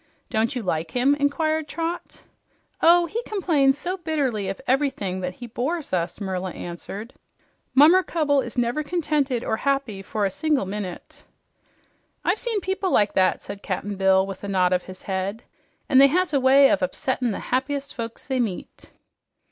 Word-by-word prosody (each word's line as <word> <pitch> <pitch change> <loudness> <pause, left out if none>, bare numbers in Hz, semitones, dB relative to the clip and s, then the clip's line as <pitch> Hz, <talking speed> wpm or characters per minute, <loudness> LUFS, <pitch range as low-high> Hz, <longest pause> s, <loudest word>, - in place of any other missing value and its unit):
"Don't 225 +3 0
you 245 - -3
like 160 -3 -1
him?" 255 +6 +2
inquired 310 +2 0
Trot. 335 +2 -5 0.6
"Oh, 345 +1 +6
he 440 +8 -3
complains 315 - +2
so 360 +5 -3
bitterly 280 - -1
of 195 - -5
everything 255 -9 0
that 180 0 -4
he 245 - -8
bores 270 - -3
us," 170 0 -1
Merla 190 -2 -3
answered. 195 +6 -7 0.6
"Mummercubble 305 -1 +5
is 240 - -8
never 245 +5 +1
contented 290 -6 -1
or 220 - -1
happy 270 -8 -1
for 205 +2 -2
a 195 - 0
single 300 -1 0
minute." 190 -2 -7 1.0
"I've - - +2
seen 455 -4 -1
people 380 +1 -1
like 205 - +3
that," 185 -1 +2
said 200 0 -8
Cap'n 200 +1 -3
Bill 190 0 +3
with 195 0 -8
a - - -4
nod 185 -2 +2
of 180 - +2
his 185 0 -11
head. 195 +3 -3 0.4
"An' 260 - +5
they 275 - +9
has 340 +2 +1
a 280 - +4
way 270 +1 +6
of - - +3
upsettin' 245 +7 -1
the 205 - -3
happiest 280 +2 -1
folks 230 -1 -6
they 265 -2 -1
meet." 215 -7 -4
255 Hz, 170 wpm, -24 LUFS, 195-300 Hz, 1.0 s, they